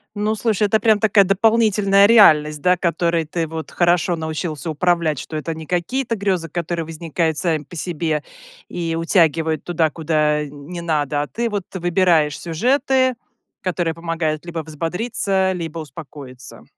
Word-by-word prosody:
Ну, 210 +1 0
слушай, 215 -2 0
это 220 +2 +2
прям 215 -2 +3
такая 205 -2 +4
дополнительная 200 -1 +3
реальность, 150 -10 +5
да, 180 0 +4
которой 170 -1 0
ты 165 +1 -3
вот 160 0 -7
хорошо 175 0 +2
научился 160 -1 -4
управлять, 165 -2 +1
что 155 - -7
это 165 +2 -3
не 160 0 -9
какие-то 230 - -1
грезы, 190 -5 -1
которые 170 0 -3
возникают 160 0 -2
сами 160 -4 0
по 175 - -13
себе 160 -3 -2 0.4
и 165 -2 -3
утягивают 160 -2 +1
туда, 165 -2 +1
куда, 150 -1 0
э, 150 - -4
не 150 +5 -8
надо, 150 -3 0
а 145 - -3
ты 235 +6 -2
вот 205 -3 -3
выбираешь 175 -4 +2
сюжеты, 260 - +1 0.5
которые 175 -3 -1
помогают 165 -1 -3
либо 165 -2 -5
взбодриться, 190 +5 -1
либо 165 -2 -5
успокоиться. 145 -4 -10
170 Hz, 150 wpm, -20 LUFS, 155-190 Hz, 0.5 s, реальность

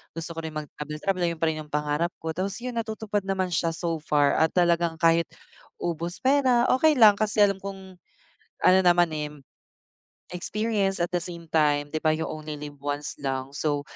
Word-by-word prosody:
gusto 165 0 -5
ko 165 - -6
rin 160 -1 -6
mag-travel-travel 155 +5 -3
ay - - +1
yun 160 - -20
pa 165 - +1
rin 155 - -5
yung 155 - -8
pangarap 150 +3 0
ko. 160 0 -4
Tapos 190 +4 -2
yun, 245 -2 -3
natutupad 215 -3 -3
naman 190 -2 -1
siya 165 0 0
so 165 -1 -2
far 145 -2 +2
at 160 +2 +2
talagang 170 -2 +2
kahit 165 0 +3 0.5
ubos 170 - -4
pera 260 -3 +3
okey 310 +3 +4
lang, 215 -3 +8
kasi 215 0 0
alam 195 -1 +2
kong 190 -1 -9 0.7
ano 185 - +7
naman 175 -1 +4
eh, 150 -1 -3 1.1
experience, 200 +1 0
at 175 0 -1
the 175 - +2
same 170 -1 -6
time 145 -2 +1
di 155 - 0
ba, 155 - +3
"You 160 +1 -3
only 155 0 -6
live 145 -1 -9
once" 145 +1 -3
lang, 135 -1 -3
so 145 -1 -1
170 Hz, 190 wpm, -26 LUFS, 155-195 Hz, 1.1 s, lang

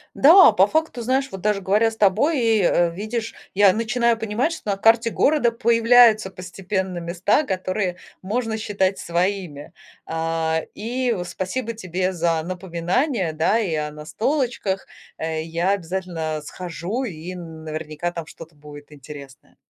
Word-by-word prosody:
Да, 340 +1 +8
по 200 -2 +4
факту, 315 -1 -1
знаешь, 265 +3 0
вот 190 - -7
даже 210 -1 0
говоря 210 +4 +2
с 220 - -12
тобой, 225 - +3
и, 225 -3 +3
э, 175 0 +3
видишь, 220 +5 -4 0.2
я 195 -1 +5
начинаю 230 +1 +1
понимать, 225 +8 -1
что 315 -9 -7
на 195 - -1
карте 225 +3 +4
города 275 0 +2
появляются 230 -2 +4
постепенно 185 +1 -4
места, 175 - +1
которые 185 -4 -2 0.2
можно 220 +3 -2
считать 200 -3 -1
своими. 175 -4 -3 0.3
А, 160 0 -1
и, 245 +3 -2
э, 175 - -3
спасибо 230 +7 -4
тебе 185 -2 -2
за 165 -2 0
напоминание, 185 - -1
да, 160 +8 +2
и 185 -8 -1
о 150 -1 -3
настолочках. 205 - -2 0.3
Э, 160 0 -3
я 170 +3 -1
обязательно 170 -4 -3
схожу, 180 - -5
и 180 -5 -6
н 165 -3 -9
наверняка 155 +2 -4
там 170 -2 -6
что-то 160 0 -13
будет 145 0 -13
интересное. 140 -1 -12
190 Hz, 145 wpm, -22 LUFS, 170-225 Hz, 0.3 s, Да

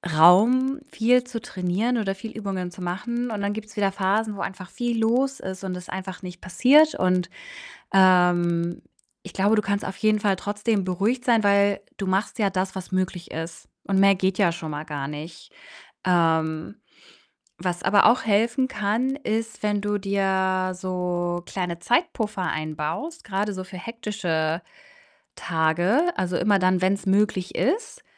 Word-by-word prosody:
Raum, 240 - +5
viel 245 +2 +3
zu 240 -3 -6
trainieren 190 +7 -1
oder 195 -3 -1
viel 220 +3 -8
Übungen 195 -4 -4
zu 185 - -12
machen, 235 +7 -3
und 205 -2 -3
dann 200 +1 -1
gibt's 215 -1 -8
wieder 200 -2 +1
Phasen, 205 +2 0
wo - - -5
einfach 185 -1 -6
viel 240 -2 -2
los 260 +4 +1
ist 190 0 -7
und 185 -1 -3
es 180 0 -9
einfach 190 0 -6
nicht 180 0 -8
passiert 270 - +5
und, 180 -1 +1 0.6
ähm, 175 -2 +3 0.4
ich 190 - -10
glaube, 205 +3 +3
du 210 - +2
kannst 200 0 -2
auf 190 - -5
jeden 215 -1 +2
Fall 200 -2 +2
trotzdem 205 0 -1
beruhigt 205 +8 -1
sein, 230 -4 +3
weil 200 0 +3 0.2
du 195 -2 -4
machst 195 +5 -1
ja 205 -2 +3
das, 190 0 -2
was 190 -1 -7
möglich 185 -1 -2
ist, 165 +1 -7 0.2
und 195 -1 +2
mehr 195 0 +6
geht 185 0 0
ja 180 -4 +4
schon 160 -2 -6
mal 150 +1 -4
gar 145 -3 -4
nicht. 155 - -9 0.5
Ähm, 160 -1 +1 0.8
was 180 -1 -3
aber 205 0 +5
auch 240 +2 +4
helfen 230 +5 +2
kann, 230 +3 -1
ist, 225 -4 -3
wenn 205 -1 0
du 205 0 -1
dir 190 -1 0
so 180 -1 -2
kleine 180 -3 -4
Zeitpuffer 220 - 0
einbaust, 155 - -4
grade 205 0 -2
so 185 -1 -5
für 185 -1 -10
hektische 180 -7 -2 0.7
Tage, 170 - +1 0.2
also 180 -1 0
immer 205 -2 +3
dann, 185 0 +2
wenn's 195 +2 +1
möglich 195 -1 +1
ist, 435 - -1
195 Hz, 165 wpm, -24 LUFS, 180-215 Hz, 0.8 s, mehr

